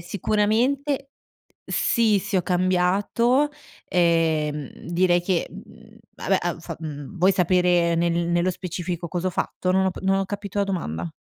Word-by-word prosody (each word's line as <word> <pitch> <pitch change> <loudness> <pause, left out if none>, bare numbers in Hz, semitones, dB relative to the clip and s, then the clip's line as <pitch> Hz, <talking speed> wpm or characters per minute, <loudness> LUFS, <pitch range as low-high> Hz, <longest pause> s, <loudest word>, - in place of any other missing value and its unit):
sicuramente 235 - 0 0.5
sì, 225 -4 +2
sì, 195 - -2
ho 185 - +2
cambiato, 190 - +2 0.4
ehm, 160 -4 +1 0.2
direi 175 0 +3
che, 175 -1 0
mhmm, - - -14 0.2
vabbè - - 0
han - - -3
fa - - -7
mhmm, 155 +3 -7
vuoi 185 +3 +4
sapere 180 -2 +3
nel 170 0 +1 0.2
nello 175 +1 +2
specifico 175 -1 -5
cos'ho 180 +3 -2
fatto? 185 +1 -2
Non 190 0 +3
ho 190 - +2
p - - -9
non 195 0 +2
ho 195 - 0
capito 205 0 -5
la 200 - +3
domanda. 85 - -3
180 Hz, 150 wpm, -24 LUFS, 170-200 Hz, 0.5 s, vuoi